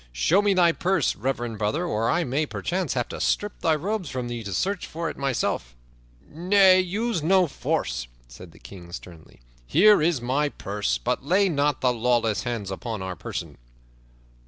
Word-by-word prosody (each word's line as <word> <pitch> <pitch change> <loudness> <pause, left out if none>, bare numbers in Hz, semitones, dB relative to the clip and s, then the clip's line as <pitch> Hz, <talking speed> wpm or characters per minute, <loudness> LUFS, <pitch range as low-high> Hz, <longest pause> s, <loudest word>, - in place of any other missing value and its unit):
Show 150 - +3
me 205 -1 +2
thy 175 -2 +5
purse, 180 -2 0
reverend 120 -2 -3
brother, 125 +12 0
or 115 -8 0
I 175 - +2
may 150 +2 -1
perchance 180 -4 -2
have 120 -2 -1
to - - -6
strip 205 0 -1
thy 160 -1 +2
robes 185 +1 -3
from 125 -2 -4
thee 120 -1 -5
to 100 - -5
search 190 - -1
for 165 0 -4
it - - -12
myself." 125 - -2 0.5
"Nay, 185 +3 +4
use 200 +2 -1
no 185 +4 +4
force," 65 - -2 0.2
said - - -13
the - - -18
King 90 -3 -12
sternly. 85 -7 -11 0.3
"Here 205 +2 +6
is 160 -3 +2
my 135 +5 0
purse, 100 -5 -2
but 125 +1 -2
lay 190 +7 +3
not 145 -3 0
thy 125 - +3
lawless 115 -3 +1
hands 115 -5 -4
upon 110 +1 -5
our 95 -1 -4
person." - - -7
140 Hz, 180 wpm, -25 LUFS, 115-180 Hz, 0.5 s, Here